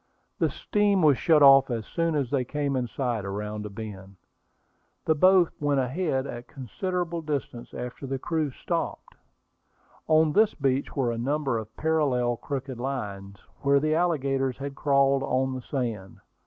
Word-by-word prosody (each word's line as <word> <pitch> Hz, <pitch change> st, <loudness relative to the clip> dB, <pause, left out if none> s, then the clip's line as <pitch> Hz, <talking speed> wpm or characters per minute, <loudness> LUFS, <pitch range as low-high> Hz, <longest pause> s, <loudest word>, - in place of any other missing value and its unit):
The -, -, +2 dB
steam 205 Hz, -3 st, +1 dB
was 145 Hz, -4 st, +5 dB
shut 155 Hz, -3 st, +4 dB
off 135 Hz, -1 st, +7 dB
as 115 Hz, -3 st, -3 dB
soon 165 Hz, +3 st, -1 dB
as 140 Hz, -5 st, -1 dB
they 135 Hz, -3 st, +1 dB
came 140 Hz, +1 st, -2 dB
in 125 Hz, -1 st, -1 dB
sight 120 Hz, -4 st, -2 dB
around 105 Hz, +2 st, -4 dB
a -, -, -9 dB
bend. 100 Hz, -2 st, -9 dB, 0.9 s
The 160 Hz, -, +4 dB
boat 185 Hz, +2 st, +5 dB
went 145 Hz, -2 st, +1 dB
ahead 135 Hz, +1 st, -1 dB
a 120 Hz, -3 st, -6 dB
considerable 170 Hz, -, -4 dB
distance 140 Hz, -6 st, -4 dB
after 125 Hz, +3 st, -7 dB
the 135 Hz, 0 st, -2 dB
screw 155 Hz, +2 st, -1 dB
stopped. 130 Hz, -, -4 dB, 0.9 s
On 155 Hz, -1 st, +4 dB
this 215 Hz, +3 st, +3 dB
beach 135 Hz, -2 st, -1 dB
were 130 Hz, -4 st, +1 dB
a 115 Hz, -, -4 dB
number 135 Hz, -1 st, 0 dB
of 110 Hz, 0 st, -10 dB
parallel 135 Hz, -7 st, +1 dB
crooked 135 Hz, -2 st, -5 dB
lines, 100 Hz, -7 st, -5 dB, 0.2 s
where 140 Hz, 0 st, +4 dB
the 155 Hz, +2 st, 0 dB
alligators 135 Hz, -6 st, 0 dB
had 140 Hz, 0 st, -5 dB
crawled 140 Hz, -1 st, +2 dB
on 130 Hz, 0 st, 0 dB
the 130 Hz, -, -5 dB
sand. 115 Hz, -8 st, -4 dB
135 Hz, 160 wpm, -26 LUFS, 120-150 Hz, 0.9 s, off